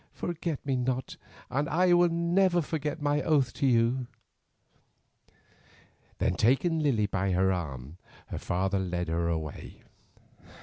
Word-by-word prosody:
"Forget 165 Hz, -4 st, -4 dB
me 135 Hz, -2 st, 0 dB
not 130 Hz, +1 st, -2 dB, 0.4 s
and 145 Hz, +3 st, 0 dB
I 180 Hz, +3 st, +3 dB
will 175 Hz, 0 st, +5 dB
never 175 Hz, +1 st, +2 dB
forget 150 Hz, 0 st, -3 dB
my 145 Hz, 0 st, +1 dB
oath 140 Hz, -6 st, +2 dB
to 140 Hz, -, 0 dB
you." 120 Hz, +1 st, +2 dB, 2.1 s
Then -, -, +1 dB
taking 135 Hz, -, +2 dB
Lily 130 Hz, -9 st, +2 dB
by 95 Hz, -1 st, -1 dB
the 90 Hz, -, +1 dB
arm 85 Hz, -5 st, -2 dB, 0.3 s
her -, -, -4 dB
father 95 Hz, +2 st, -1 dB
led 90 Hz, -2 st, -2 dB
her 85 Hz, +1 st, 0 dB
away. 80 Hz, -3 st, -5 dB
130 Hz, 130 wpm, -28 LUFS, 95-155 Hz, 2.1 s, will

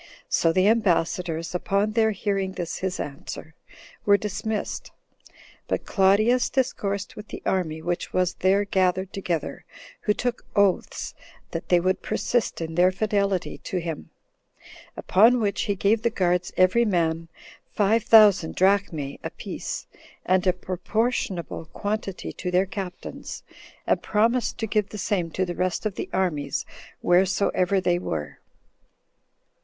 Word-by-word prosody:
So 165 Hz, -, +3 dB
the 185 Hz, +3 st, +3 dB
ambassadors, 175 Hz, -5 st, +1 dB
upon 200 Hz, +4 st, 0 dB
their 220 Hz, 0 st, +3 dB
hearing 195 Hz, -2 st, -1 dB
this 175 Hz, -3 st, -4 dB
his 185 Hz, -1 st, -3 dB
answer, 145 Hz, +2 st, -7 dB, 0.5 s
were 200 Hz, -1 st, +5 dB
dismissed. 210 Hz, +2 st, -3 dB, 0.8 s
But -, -, -2 dB
Claudius 215 Hz, +5 st, +3 dB
discoursed 200 Hz, -7 st, -1 dB
with 210 Hz, 0 st, -9 dB
the -, -, -8 dB
army 160 Hz, -4 st, -1 dB
which 175 Hz, +1 st, -2 dB
was 180 Hz, -1 st, +1 dB
there 195 Hz, +2 st, +2 dB
gathered 185 Hz, -1 st, +1 dB
together, 175 Hz, -4 st, -3 dB, 0.4 s
who 210 Hz, -, +1 dB
took 245 Hz, -1 st, -2 dB
oaths 200 Hz, -3 st, +1 dB, 0.4 s
that -, -, -5 dB
they 175 Hz, -, +5 dB
would 185 Hz, +2 st, 0 dB
persist 240 Hz, -7 st, -1 dB
in 165 Hz, 0 st, -4 dB
their 180 Hz, +2 st, +4 dB
fidelity 200 Hz, -2 st, -1 dB
to 185 Hz, -, -4 dB
him; 165 Hz, -3 st, -4 dB, 0.9 s
Upon 230 Hz, +6 st, +5 dB
which 205 Hz, -3 st, 0 dB
he 200 Hz, -, +2 dB
gave 205 Hz, +3 st, +2 dB
the 235 Hz, -, +2 dB
guards 180 Hz, -4 st, 0 dB
every 185 Hz, +6 st, +5 dB
man 165 Hz, -5 st, 0 dB, 0.4 s
five 215 Hz, +2 st, +2 dB
thousand 205 Hz, -7 st, +6 dB
13 -, -, -22 dB
drachmae 185 Hz, -7 st, +1 dB
a -, -, -3 dB
piece, -, -, -6 dB, 0.4 s
and 185 Hz, 0 st, +2 dB
a -, -, +7 dB
proportionable 185 Hz, -1 st, -2 dB
quantity 205 Hz, +2 st, -4 dB
to 180 Hz, -, -4 dB
their 180 Hz, +2 st, +3 dB
captains, 190 Hz, -2 st, -7 dB, 0.4 s
and -, -, +2 dB
promised 230 Hz, +3 st, +1 dB
to 225 Hz, -, -2 dB
give 210 Hz, -1 st, 0 dB
the 210 Hz, -, -7 dB
same 185 Hz, -4 st, -1 dB
to 185 Hz, +4 st, -1 dB
the 175 Hz, -, -4 dB
rest 185 Hz, +3 st, -1 dB
of 215 Hz, -, 0 dB
the -, -, -5 dB
armies 150 Hz, -7 st, -1 dB, 0.4 s
wheresoever 190 Hz, +1 st, +3 dB
they 175 Hz, -1 st, +1 dB
were. 80 Hz, -, -4 dB
190 Hz, 140 wpm, -25 LUFS, 175-210 Hz, 0.9 s, a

